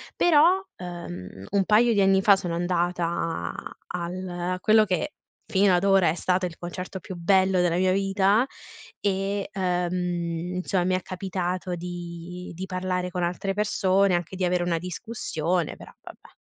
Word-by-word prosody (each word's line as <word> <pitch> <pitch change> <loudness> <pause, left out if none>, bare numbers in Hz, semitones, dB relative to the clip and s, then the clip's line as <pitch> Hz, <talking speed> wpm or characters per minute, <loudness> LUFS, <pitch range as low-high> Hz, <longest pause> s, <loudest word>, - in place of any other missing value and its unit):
Però, 345 +3 +5
ehm, 100 - -8
un 200 -1 +2
paio 225 +3 +4
di 205 - +3
anni 195 0 +4
fa, 200 0 +6
sono 180 -3 -3
andata 175 -1 -1 0.3
al 180 +1 -4
a 180 +1 -3
quello 215 +2 +5
che, 180 -6 -1 0.3
fino 195 0 +3
ad 175 - +1
ora, 195 -2 +4
è 160 - 0
stato 185 +1 0
il 170 -2 -6
concerto 180 +2 -6
più 185 - -8
bello 190 +2 +3
della 175 -1 +2
mia 185 0 +3
vita 195 +4 +3 0.5
e, 195 0 -1
ehm, 180 -2 0 0.6
insomma, 180 0 0
mi 185 0 +2
è 185 - -1
capitato 185 -1 -3
di 175 0 -7
di 185 +3 -5
parlare 185 -1 -2
con 180 0 -2
altre 180 +3 -1
persone, 195 -2 +2
anche 175 +1 -3
di 185 0 0
avere 180 0 +1
una 175 -1 0
discussione, 180 -3 -2
però - - -13
vabbè - - -13
185 Hz, 160 wpm, -25 LUFS, 175-195 Hz, 0.6 s, fa